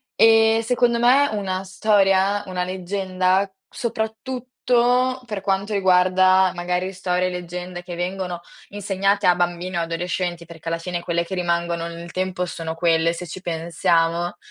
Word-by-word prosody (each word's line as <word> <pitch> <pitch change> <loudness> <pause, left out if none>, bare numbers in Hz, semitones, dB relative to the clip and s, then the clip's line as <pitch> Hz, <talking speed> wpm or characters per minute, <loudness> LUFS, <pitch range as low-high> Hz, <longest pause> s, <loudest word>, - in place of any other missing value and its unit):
ehm, 225 0 +5
secondo 240 0 +1
me 265 +4 +5
una 190 -2 -2
storia, 195 0 +2
una 180 -1 -2
leggenda, 185 +1 0 0.2
soprattutto 250 +2 -1
per 210 -5 -5
quanto 195 +1 -1
riguarda, 185 0 +4
magari, 180 +2 -2
storie 185 -1 0
e - - -3
leggende 180 0 -6
che 175 -1 -7
vengono 180 0 -3 0.3
insegnate 200 0 0
a 175 - +5
bambini 175 +1 -2
o - - +1
adolescenti 175 +1 -3
perché, 165 0 -8
alla 165 - -1
fine, 175 +1 -4
quelle 170 0 -1
che 190 +2 -5
rimangono 170 -1 -1
nel 170 0 -8
tempo 185 -1 -2
sono 165 -2 -5
quelle, 165 -1 +2
se 175 +1 -7
ci 185 +3 -8
pensiamo, 170 0 0
185 Hz, 145 wpm, -22 LUFS, 175-200 Hz, 0.3 s, ehm